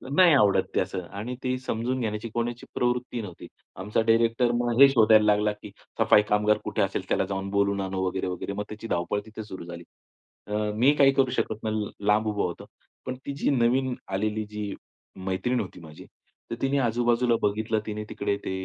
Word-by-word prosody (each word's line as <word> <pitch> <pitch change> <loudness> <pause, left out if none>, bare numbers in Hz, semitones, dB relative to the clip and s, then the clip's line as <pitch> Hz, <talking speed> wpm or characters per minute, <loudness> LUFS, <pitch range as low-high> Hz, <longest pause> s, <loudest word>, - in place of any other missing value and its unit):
नाही 180 -3 +7
आवडत 105 -7 +4
ते - - +3
असं 95 - -3 0.2
आणि 125 +4 -4
ते 130 0 0
समजून 130 +1 -2
घेण्याची 110 0 -3
कोणाची 120 +1 -3
प्रवृत्ती 125 -1 -1
नव्हती. 90 -5 -9 0.3
आमचा 105 +4 -1
डायरेक्टर 115 +2 +3
मग 120 0 0
हे 140 - +10
शोधायला 110 -4 +5
लागला, 105 0 +3
की 105 -1 -12 0.3
सफाई 105 - +6
कामगार 105 +1 +3
कुठे - - -1
असेल, - - -1
त्याला - - +1
जाऊन 95 0 -4
बोलवून 100 0 +1
आणू 95 0 -2
वगैरे, 95 0 -2
वगैरे 90 +2 -4
मग 105 +1 -3
त्याची 110 +1 -7
धावपळ 90 +3 -1
तिथे 110 0 -8
सुरू 95 -5 -9
झाली. 85 0 -8 0.6
अ, 105 - -5 0.2
मी 130 +7 +4
काही 140 -1 +6
करू 135 -2 +2
शकत 110 -1 -2
नाही. 110 -1 -2 0.2
लांब 110 +1 +3
उभा 105 -1 0
होतो. 85 - -4 0.4
पण 130 - -3
ती 140 - -3
जी - - 0
नवीन 130 +1 +2
आलेली, 105 +2 -2
जी 105 -1 -5 0.5
मैत्रीण 120 +7 0
होती 95 - -6
माझी, 80 -2 -12 0.5
तर - - -1
तिने 135 +1 +1
आजू-बाजूला 120 0 +2
बघितलं, 110 +2 0
तिने 105 0 -4
तिकडे 100 - -1
ते - - -2
110 Hz, 190 wpm, -26 LUFS, 100-120 Hz, 0.6 s, हे